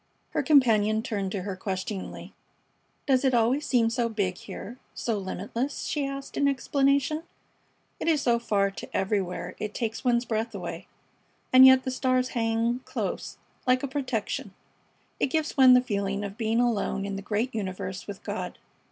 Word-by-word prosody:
Her - - 0
companion 220 -7 +4
turned 200 -4 -2
to 195 -3 -3
her 195 -1 -4
questioningly: 190 +1 -5 0.7
"Does 265 -2 +3
it 260 -2 +3
always 245 +6 +2
seem 230 -3 +3
so 235 -1 0
big 200 -5 -1
here 245 +4 -8 0.2
so 225 -3 -1
limitless?" 205 +8 -3
she 290 -2 -1
asked 275 0 -6
in 280 - +3
explanation. 280 +2 +1 0.8
"It - - -3
is 310 -4 +3
so 235 -1 +3
far 200 -4 +1
to - - -6
everywhere 190 -2 -1
it 210 -1 -4
takes 225 -2 -3
one's 245 -1 +2
breath 225 0 -2
away, - - -6 0.7
and 260 +1 +10
yet 260 0 +7
the 260 - -2
stars 255 0 +1
hang 230 +1 0
close, - - -4 0.3
like 255 +1 +3
a - - 0
protection. 260 -5 -3 0.6
It - - +2
gives 315 +3 -1
one 260 -3 +8
the 250 - +6
feeling 200 -4 -2
of 200 -1 -5
being 225 0 0
alone 220 -4 0
in 200 0 -3
the 195 - -4
great 215 +5 -1
universe 190 -2 -4
with 200 -2 -8
God. - - -4
230 Hz, 170 wpm, -27 LUFS, 205-260 Hz, 0.8 s, and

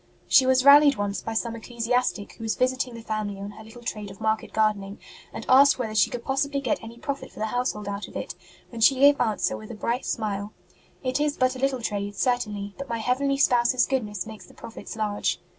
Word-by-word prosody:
She 260 -2 +5
was 260 0 +3
rallied 285 0 +8
once 205 -2 -2
by 225 - -5
some 230 0 -1
ecclesiastic 235 -1 -2
who 225 - -11
was 220 - -1
visiting 255 -1 0
the 230 - -9
family 215 -3 -3
on 200 +1 -6
her 220 - -12
little 225 +2 -13
trade 210 -3 -5
of 195 - -12
market 220 0 -1
gardening, 210 -2 0 0.3
and 225 - -7
asked 275 +2 +6
whether 225 -4 -3
she 210 -4 +3
could 240 -1 -6
possibly 280 +1 0
get 255 -5 -1
any 230 +1 -10
profit 275 +3 -5
for - - -20
the 215 - -1
household 220 -3 -2
out 200 0 -4
of - - -15
it, - - -5 0.4
when 230 -2 -8
she 270 +5 +6
gave 285 0 +6
answer 215 -3 0
with 215 - -10
a 235 - -7
bright 235 +4 -2
smile: 205 -1 -3 0.5
It 255 +2 0
is 295 0 0
but 255 0 +2
a - - -7
little 265 -2 0
trade, 205 -1 -3
certainly, 210 -5 -1
but 275 - -6
my 230 - -1
heavenly 270 +4 0
Spouse 245 -2 +3
s 255 - +4
goodness 210 -8 -2
makes 220 -1 -10
the - - -18
profits 225 -1 -9
large. 210 -2 -1
230 Hz, 225 wpm, -25 LUFS, 210-255 Hz, 0.5 s, rallied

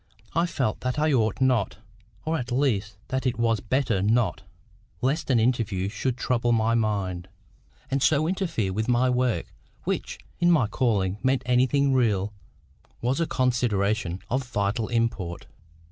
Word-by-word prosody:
I 170 +2 +2
felt 135 -10 -1
that 125 0 -2
I 155 0 +2
ought 110 -5 +1
not, 125 -6 +2 0.5
or 160 0 0
at 125 0 -5
least 110 -7 0
that 130 0 -1
it 120 - -1
was 115 -2 +2
better 120 -2 0
not, 110 +3 +1 0.6
lest 140 - -1
an 125 -3 +4
interview 110 -5 0
should 120 +4 -2
trouble 120 -2 +1
my 115 0 +2
mind, 100 -5 -1 0.6
and 135 0 +1
so 150 +3 +3
interfere 165 - -1
with 110 +3 -1
my 125 +1 +3
work, 125 -2 0 0.3
which, - - -3 0.2
if 175 0 +4
my 160 -9 +4
calling 105 -4 0
meant 130 0 +1
anything 130 +3 +3
real, 105 -5 +1 0.7
was 125 +5 0
a 165 - +1
consideration 110 -7 0
of 130 +4 0
vital 105 0 -1
import. 115 -7 -1
120 Hz, 150 wpm, -26 LUFS, 105-130 Hz, 0.7 s, an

